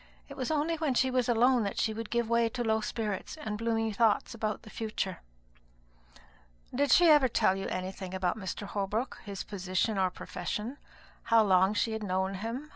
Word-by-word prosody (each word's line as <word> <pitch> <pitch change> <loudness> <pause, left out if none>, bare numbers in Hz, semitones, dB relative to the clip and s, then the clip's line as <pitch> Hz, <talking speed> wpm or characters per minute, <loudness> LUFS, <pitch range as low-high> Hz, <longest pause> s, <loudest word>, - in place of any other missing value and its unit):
It 280 - -8
was 260 -3 -3
only 315 +2 0
when 305 -5 0
she 260 +1 +2
was 250 -1 +1
alone 240 +2 +4
that 200 -2 -3
she 220 - +1
would 225 0 -6
give 235 -1 0
way 235 0 +2
to 240 +2 -3
low 220 -1 +1
spirits 215 +5 -4
and 215 -8 -5
gloomy 225 -1 0
thoughts 225 +3 +2
about 215 -2 -3
the 215 - -12
future." 215 -4 -3 1.5
"Did 285 +3 +1
she 350 - +7
ever 295 -4 +6
tell 190 -5 +2
you 195 - -4
anything 185 0 -4
about 185 0 0
Mr. 205 -1 -5
Holbrook 210 +5 -2
his 200 -3 -5
position 195 +1 -1
or 185 -1 +3
profession? 210 +9 -5 0.5
how 230 -1 +5
long 190 0 +4
she 225 +3 +1
had 220 0 -3
known 190 -1 -1
him? 230 +9 -5
220 Hz, 190 wpm, -30 LUFS, 195-240 Hz, 1.5 s, she